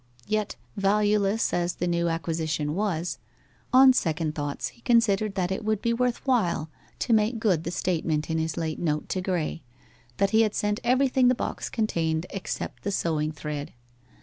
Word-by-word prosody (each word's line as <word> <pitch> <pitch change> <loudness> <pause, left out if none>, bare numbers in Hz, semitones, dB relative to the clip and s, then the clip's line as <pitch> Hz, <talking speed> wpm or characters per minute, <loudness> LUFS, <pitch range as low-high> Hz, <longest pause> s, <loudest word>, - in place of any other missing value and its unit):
Yet 215 -1 -1 0.2
valueless 205 +1 +2
as 175 0 0
the 180 - -2
new 170 -1 +1
acquisition 160 -2 -1
was, 180 -3 -1 0.5
on 260 +1 +8
second 160 -7 0
thoughts 145 -1 -3
he - - -22
considered 215 -4 +2
that 185 -1 0
it 190 - -2
would 215 -1 0
be 235 +2 0
worth 250 +2 -1
while 180 - +1 0.3
to 240 - 0
make 220 +2 +3
good 190 -8 +1
the - - -1
statement 165 -3 -1
in 160 0 -1
his 160 0 -2
late 160 -2 -2
note 150 -3 -1
to 185 - -1
Graye 175 -3 -2 0.6
that 195 0 +2
he 220 - +5
had 215 -2 +1
sent 210 0 0
everything 255 +1 +3
the 250 - +4
box - - -4
contained 165 -8 0
except 195 - -5
the - - -2
sewing 155 -5 0
thread. 150 -1 -5
185 Hz, 175 wpm, -26 LUFS, 160-215 Hz, 0.6 s, on